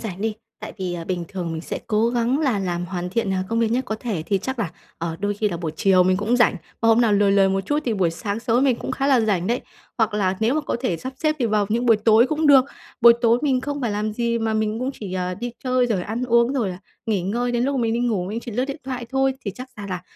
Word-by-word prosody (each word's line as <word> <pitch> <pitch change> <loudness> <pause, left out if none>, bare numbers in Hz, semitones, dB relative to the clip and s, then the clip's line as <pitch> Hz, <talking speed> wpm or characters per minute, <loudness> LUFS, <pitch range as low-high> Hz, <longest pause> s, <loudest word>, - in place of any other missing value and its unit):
rảnh 195 -4 -6
đi, 220 0 -1 0.3
tại - - -7
vì, 180 -2 -3
à, 170 -1 -5
bình 175 -1 -3
thường 175 -4 -4
mình 160 - -4
sẽ - - -5
cố 220 +1 +2
gắng 240 +3 +1
là 265 -9 +1
làm 175 -2 -2
hoàn 180 -1 -4
thiện, 200 -2 0
à, 185 0 0
công 230 0 0
việc 225 -1 +1
nhất 255 +3 0
có 220 - -3
thể 210 -10 -3
thì 200 -2 +1
chắc 260 +6 -4
là, 200 -9 -1 0.3
ờ, 165 0 -3
đôi 205 0 0
khi 210 +1 0
là 175 - -4
buổi 165 -2 -4
chiều 190 -2 +4
mình 185 +1 +2
cũng 215 +5 +1
rảnh. 240 -5 +4 0.2
Và 225 - +2
hôm 225 +1 +5
nào 225 -3 +3
lười 200 -1 +4
lười 195 -1 +4
một 195 0 +1
chút 290 +10 -1
thì 235 - 0
buổi 185 -5 +1
sáng 200 +6 -4
sớm 240 +2 +2
mình 255 -4 +3
cũng - - -5
khá 275 - -1
là 265 -4 +4
rảnh 195 -5 0
đấy 240 +2 0 0.4
hoặc 220 -1 +1
là 190 -2 +1
nếu 230 +5 +2
mà 310 - +1
có 285 - -2
thể 210 -10 0
sắp 260 +6 -6
xếp 310 +2 0
thì 240 - +1
vào 210 -2 +1
những 235 +3 0
buổi 225 -2 +6
tối 220 +3 +5
cũng 310 +1 0
được. 270 -3 +7 0.4
Buổi 235 0 +9
tối 235 0 +4
mình 265 -3 +2
không 285 +1 -4
phải 240 -4 -1
làm 210 +1 -2
gì 235 +1 0
mà 220 -1 -1
mình 215 0 0
cũng 255 +2 -2
chỉ, 195 -4 -7
à, 180 0 -2
đi 240 +4 -5
chơi 255 -1 +2
rồi 210 -6 0
ăn 225 +6 -3
uống, 235 +1 +3
rồi 240 -8 0
là 180 - -6 0.3
nghỉ 205 -5 0
ngơi 240 +6 -1
đến 240 0 +1
lúc 275 +1 0
mà 245 - 0
mình 225 - +1
đi 235 - 0
ngủ, 220 -7 0
mình 215 +5 -4
chỉ 240 - -8
lướt 250 +4 0
điện 275 +2 -6
thoại 250 -3 -5
thôi. 270 0 +1
Thì 200 - -2
chắc 255 +6 -9
ra 205 - -7
là 180 -1 -4
225 Hz, 305 wpm, -22 LUFS, 195-245 Hz, 0.4 s, Buổi